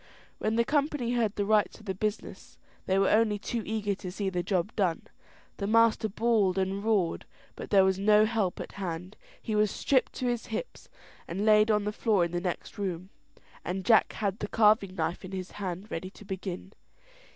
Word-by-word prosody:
When 215 +1 0
the 235 0 +2
company 285 -4 0
heard 225 -4 0
the 205 - -1
rights 210 0 +2
of 215 - -16
the 190 - -2
business, 210 +3 -5 0.3
they 190 - +2
were 195 0 +3
only 215 -1 +3
too 230 +3 -3
eager 210 -1 -1
to 185 -2 -7
see 195 0 -2
the 180 -1 -1
job 185 +2 -1
done. 185 -6 0 0.5
The 200 - -3
master 225 0 +3
bawled 210 -3 +1
and 190 +1 -1
roared, 205 -6 0 0.3
but - - -8
there 195 -2 +5
was 190 0 +1
no 210 +1 +5
help 215 -5 -1
at - - -6
hand. 180 0 -5 0.2
He 220 - -4
was 210 0 +3
stripped 260 +6 +1
to 255 - -4
his 240 -2 -1
hips, - - -6 0.4
and 195 +5 -2
laid 215 0 +5
on 210 -1 +2
the 210 - -1
floor 210 -4 +2
in 170 - -5
the 175 0 -2
next 180 +3 -5
room, 185 -1 -4 0.5
and 185 +1 -4
Jack 225 -2 +4
had 200 -1 -2
the 205 - -3
carving 210 -3 +3
knife 170 +1 -2
in 185 +1 -8
his 185 -1 -5
hand 190 +2 -5
ready 185 +3 -4
to 205 - -15
begin. 190 0 -6
205 Hz, 200 wpm, -29 LUFS, 190-220 Hz, 0.5 s, there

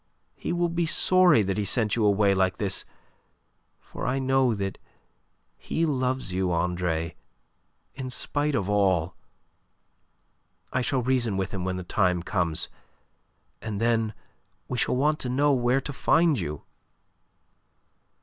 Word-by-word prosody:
He - - -4
will 175 0 +1
be 170 0 -1
sorry 180 - +4
that 95 +1 -1
he - - 0
sent 110 +1 +1
you 115 - 0
away 100 -1 +4
like 95 -1 +1
this 100 -2 -1 0.9
for - - -7
I 125 +2 0
know 130 -3 +2
that 100 -2 -4 0.8
he 165 - -1
loves 130 - -1
you, 95 -1 0
Andre, 85 -1 -1 0.8
in 130 -1 -6
spite 145 +3 -2
of 100 -5 -1
all. 95 -5 +2 1.6
I 130 - +1
shall 130 0 0
reason 120 -5 +1
with 95 0 -2
him 95 -3 -4
when 95 0 -2
the 90 - -5
time 90 -1 +1
comes. 85 -5 -1 0.9
And 105 -3 -4
then 115 -2 +1 0.5
we 125 - -3
shall - - +1
want 150 +4 +1
to 125 - -3
know 140 +3 +3
where 125 +1 +2
to 145 - -5
find 160 +1 +3
you." 75 0 -5
110 Hz, 140 wpm, -26 LUFS, 95-135 Hz, 1.6 s, sorry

